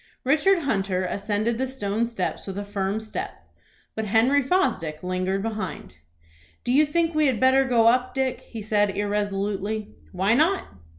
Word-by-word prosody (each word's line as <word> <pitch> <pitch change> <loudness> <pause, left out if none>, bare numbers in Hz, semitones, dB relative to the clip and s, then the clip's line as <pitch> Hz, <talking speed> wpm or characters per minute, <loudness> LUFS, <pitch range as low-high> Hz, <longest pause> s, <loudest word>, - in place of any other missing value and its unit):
Richard 320 +6 +3
Hunter 195 -7 0
ascended 210 +5 -1
the 265 - 0
stone 230 -3 -1
steps 215 -5 -4
with 195 0 -5
a 205 - -4
firm 200 0 -2
step, 220 -1 -6 0.5
but 220 - -3
Henry 235 +7 +3
Fosdick 180 - 0
lingered 185 +2 -1
behind. 210 - -5 0.7
"Do - - -1
you 295 +4 +4
think 335 +2 +1
we 310 -1 +3
had 250 -5 0
better 260 +1 +4
go 240 -3 +3
up, 250 +2 +3
Dick?" 265 -1 -1
he 225 -3 -8
said 205 -2 +1
irresolutely. 205 +1 -2 0.2
"Why 190 +3 +1
not?" 325 +9 +3
220 Hz, 160 wpm, -24 LUFS, 200-260 Hz, 0.7 s, you